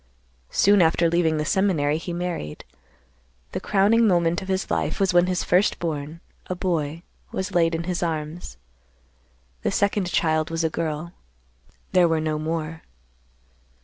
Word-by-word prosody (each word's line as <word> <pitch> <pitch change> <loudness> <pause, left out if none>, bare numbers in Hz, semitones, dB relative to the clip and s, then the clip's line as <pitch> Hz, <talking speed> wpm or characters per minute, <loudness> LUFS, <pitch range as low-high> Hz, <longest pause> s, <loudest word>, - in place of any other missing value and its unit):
Soon 200 -1 +4
after 165 +1 +3
leaving 165 -2 +2
the 150 - -1
seminary, 155 -5 +1
he 175 - -6
married. 170 - -4 0.9
The - - -3
crowning 215 +3 +3
moment 175 -2 +2
of 190 - -8
his 190 0 -2
life - - -1
was 195 -2 +2
when 175 0 +5
his 180 -1 0
first 180 +3 +2
born—a 160 +3 -6
boy—was 170 +1 -4
laid 165 -1 +3
in 165 - -3
his 180 0 -2
arms. 160 - -4 1.0
The - - 0
second 200 -2 +1
child 155 -1 +1
was 165 0 -2
a 160 - 0
girl; 160 +1 -3 0.8
there 180 -2 +5
were 165 -1 +1
no 155 -1 -1
more. 160 0 -3
170 Hz, 145 wpm, -24 LUFS, 155-185 Hz, 1.0 s, when